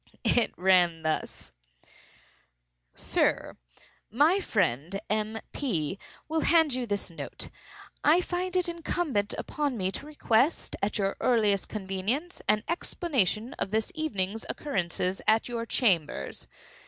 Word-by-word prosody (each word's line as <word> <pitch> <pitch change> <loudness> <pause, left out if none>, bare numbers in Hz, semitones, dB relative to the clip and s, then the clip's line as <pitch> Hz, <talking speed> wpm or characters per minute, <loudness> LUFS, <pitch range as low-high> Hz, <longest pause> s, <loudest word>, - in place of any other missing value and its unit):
It 240 - +3
ran 175 -3 +4
thus: 155 0 -3 1.4
Sir,—My 245 - 0
friend, 185 - 0
M. 215 +1 0 0.2
P., 185 - -2 0.3
will 320 +1 0
hand 320 -3 +4
you 250 -1 -2
this 200 -4 -2
note. 150 -4 -7 0.5
I 315 +4 +6
find 360 +1 -2
it 365 -1 +2
incumbent 335 - -1
upon 290 -5 -2
me 190 -2 0
to 280 - -6
request, 285 -1 +1
at 200 +2 0
your 195 -1 0
earliest 210 -5 +2
convenience, 215 - -3
an 210 +1 +3
explanation 260 - 0
of - - -1
this 220 +1 -1
evening's 220 -9 -1
occurrences 185 -8 -1
at 220 +1 +4
your 230 -1 -3
chambers. 170 - 0
220 Hz, 115 wpm, -28 LUFS, 190-295 Hz, 1.4 s, I